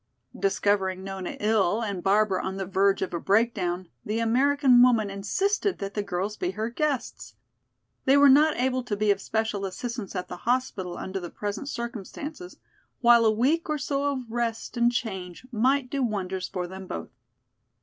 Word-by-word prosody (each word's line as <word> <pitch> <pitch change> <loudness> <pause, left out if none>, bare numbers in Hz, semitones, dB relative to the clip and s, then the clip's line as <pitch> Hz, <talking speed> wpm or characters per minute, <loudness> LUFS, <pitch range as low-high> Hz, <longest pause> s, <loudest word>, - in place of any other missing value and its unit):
Discovering 195 - 0
Nona 190 -1 -5
ill 210 0 +2
and 200 -4 -3
Barbara 195 0 +2
on 190 0 -3
the 195 - -3
verge 195 +1 +2
of 185 - -5
a 170 - -1
breakdown, 190 -4 +1 0.2
the 215 +2 -2
American 255 +2 +4
woman 230 -5 +4
insisted 385 - 0
that 195 0 -5
the 210 - -1
girls 200 +2 -3
be 180 - -1
her 220 +2 -2
guests. 285 0 -3 0.7
They 270 +2 +5
were 285 0 +7
not 295 +3 +5
able 255 0 +1
to 205 -4 -2
be 210 0 +3
of 200 0 0
special 220 -2 -2
assistance 205 +2 -5
at 180 - -3
the - - -7
hospital 215 -7 -1
under 190 +1 -4
the 175 -2 -7
present 210 +8 -5
circumstances, 270 - -6 0.4
while 235 -1 +6
a 220 - +5
week 280 +10 +1
or 305 - +1
so 280 -1 -1
of 270 -2 -3
rest 230 0 -3
and 240 0 +3
change 190 -4 -4
might 255 +3 +1
do 280 - -1
wonders 190 -5 -2
for 180 -2 -4
them 190 +1 -9
both. 80 - -6
220 Hz, 175 wpm, -26 LUFS, 195-255 Hz, 0.7 s, were